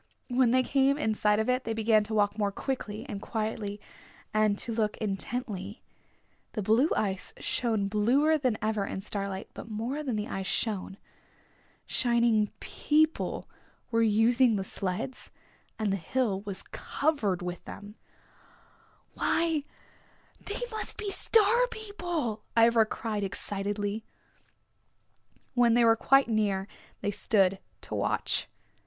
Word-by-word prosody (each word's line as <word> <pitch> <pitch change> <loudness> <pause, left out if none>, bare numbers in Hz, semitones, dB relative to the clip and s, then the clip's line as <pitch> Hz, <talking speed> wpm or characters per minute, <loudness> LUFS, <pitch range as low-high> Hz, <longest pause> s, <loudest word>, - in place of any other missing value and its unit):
When 250 -1 +4
they 255 +2 +4
came 275 +1 +3
in 220 -7 +1
sight 210 0 +2
of 220 - 0
it 255 +1 +1
they 225 - -2
began 220 -1 +4
to 220 +1 -3
walk 205 -1 +2
more 205 -2 0
quickly 225 -2 -4
and 205 -6 -5
quietly 215 -2 -3 0.5
and 215 -1 +3
to 230 - -3
look 215 -2 0
intently. 210 0 -4 0.7
The 210 - -2
blue 230 - +4
ice 195 -3 -1
shone 220 -5 0
bluer 250 +10 +3
than 255 -6 +1
ever 215 -2 0
in 190 - -4
starlight, 195 -1 -4
but - - -9
more 235 +7 -3
than 260 -6 -2
the 210 0 -2
ice 190 -1 -4
shone. 200 -3 -2 0.9
Shining 235 -3 +2
people 310 +1 +1 0.4
were 230 0 +3
using 225 +2 +4
the 195 - -1
sleds 195 +7 -4 0.5
and 215 -2 0
the - - 0
hill 200 +1 -1
was 195 -2 -4
covered 235 - -1
with 180 0 -5
them. 205 +1 -9 1.2
"Why, 325 -2 +1 0.8
they 415 - -4
must 435 - -2
be 415 -2 -3
Star 460 +4 +4
People," 350 - -4 0.2
Ivra 230 -1 +6
cried 215 -2 -3
excitedly. 205 +2 -3 1.5
When 240 -2 +4
they 240 -1 +5
were 225 0 +6
quite 270 +4 +4
near 205 -4 0 0.3
they 205 - 0
stood 195 -2 +2 0.2
to - - -8
watch. - - 0
220 Hz, 135 wpm, -29 LUFS, 205-255 Hz, 1.5 s, Ivra